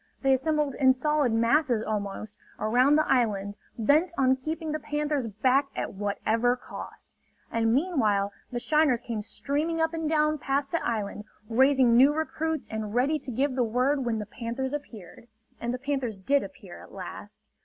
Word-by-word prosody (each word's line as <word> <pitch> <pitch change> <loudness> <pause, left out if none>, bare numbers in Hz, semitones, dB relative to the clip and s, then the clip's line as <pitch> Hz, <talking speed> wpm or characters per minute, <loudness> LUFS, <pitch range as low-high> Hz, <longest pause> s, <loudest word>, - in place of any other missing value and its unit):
They 270 0 +4
assembled 295 +1 +1
in 260 0 +4
solid 295 -1 +1
masses, 230 +1 +2
almost, 210 0 -4 0.2
around 250 +6 +3
the 310 - +2
island, 205 -6 +1 0.2
bent 290 +10 +3
on 260 -1 +4
keeping 310 +4 -4
the 310 - -2
panthers 295 -3 -2
back 255 +6 +2
at - - -3
whatever 220 +4 0
cost. 250 - -10 0.4
And 225 -1 +1
meanwhile 225 - +1 0.2
the 240 - -2
shiners 300 -2 +3
came 230 -4 -4
streaming 295 +9 -2
up 320 0 +1
and 325 -2 -2
down 305 -1 +2
past 275 +1 -1
the 335 - -1
island, 210 -2 -3 0.2
raising 260 0 +4
new 275 +5 +6
recruits 315 -1 -2
and 220 0 -5
ready 280 +5 +2
to 270 - -8
give 265 +4 0
the 255 -1 +1
word 255 +5 +1
when 235 -2 -1
the 210 - -4
panthers 240 +5 -4
appeared. 230 -8 -8 0.3
And 235 - -2
the 250 - -2
panthers 265 -5 -3
did 275 +9 +2
appear, - - -10
at - - -14
last. - - -10
260 Hz, 170 wpm, -27 LUFS, 225-295 Hz, 0.4 s, new